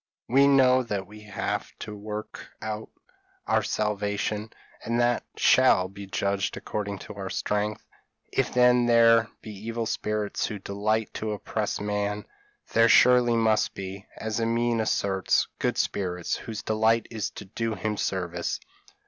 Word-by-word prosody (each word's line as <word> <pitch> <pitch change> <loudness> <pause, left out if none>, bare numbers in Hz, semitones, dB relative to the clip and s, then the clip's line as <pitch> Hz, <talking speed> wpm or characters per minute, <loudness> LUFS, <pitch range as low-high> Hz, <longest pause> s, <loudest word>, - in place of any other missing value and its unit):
We 135 +3 +5
know 130 -2 +5
that 105 -5 -3
we 105 +2 -13
have 105 - -3
to 105 - -7
work 105 +1 -7
out 110 0 -5 0.6
our - - +2
salvation, 105 0 -1 0.3
and 115 +1 -1
that 120 0 +2
we - - -13
shall 105 -8 +5
be 100 +1 -9
judged 100 -1 -1
according 100 -1 -4
to 105 - -8
our 100 -1 -6
strength; 105 +1 -2 0.5
if - - +1
then 125 -1 +4
there 115 -1 +5
be 110 - -7
evil 115 +3 -4
spirits 105 -1 -1
who 105 - -5
delight 105 +3 -1
to 110 -1 -3
oppress 105 - -3
man, 105 0 -2 0.5
there 115 0 +5
surely 125 -1 +6
must 110 -2 +2
be, 95 +1 -7
as 110 0 -3
Amine 115 0 +1
asserts, 95 -3 +1
good - - 0
spirits, 90 -3 -1
whose 110 -2 -6
delight 110 +1 +2
is 110 -3 -2
to 105 - -7
do 115 +3 -3
him 105 +3 -2
service. 90 -3 -2
105 Hz, 150 wpm, -26 LUFS, 100-115 Hz, 0.6 s, surely